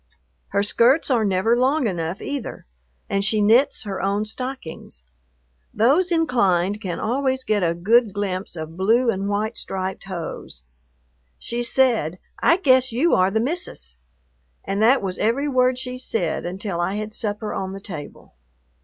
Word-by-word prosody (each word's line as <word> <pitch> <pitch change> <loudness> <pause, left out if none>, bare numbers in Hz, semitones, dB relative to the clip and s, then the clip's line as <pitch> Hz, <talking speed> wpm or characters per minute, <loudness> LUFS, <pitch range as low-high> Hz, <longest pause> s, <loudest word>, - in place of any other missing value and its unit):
Her 200 - 0
skirts 250 +8 +3
are 235 -3 +3
never 200 +3 +2
long 265 +3 +2
enough 175 -2 -3
either, 285 -4 -5 0.4
and 195 0 0
she 215 +2 +2
knits 225 +7 +4
her 200 -3 -4
own 200 +2 0
stockings. 215 - -7 0.7
Those 285 - +3
inclined 210 - +2
can 180 -5 -4
always 260 +3 0
get 215 -4 +1
a 170 -1 +1
good 220 +6 +3
glimpse 190 -2 -3
of 160 0 -7
blue 230 +6 +3
and 195 0 -3
white 215 +3 -1
striped 190 0 -4
hose. 170 - -6 0.7
She 240 +1 -4
said, 235 - +2 0.2
"I 335 - +5
guess 260 -7 +3
you 275 +9 +2
are 185 +1 +4
the 220 +3 0
Missus." 225 - -3 0.6
And 195 +1 -2
that 240 +2 +4
was 185 -2 -3
every 255 +7 +1
word 255 -2 +2
she 255 0 -6
said 175 -10 -2
until 185 -1 -3
I 185 +3 -1
had 215 +1 -4
supper 210 -1 -3
on 190 0 -3
the 195 - -7
table. 170 -8 -9
215 Hz, 155 wpm, -22 LUFS, 190-255 Hz, 0.7 s, I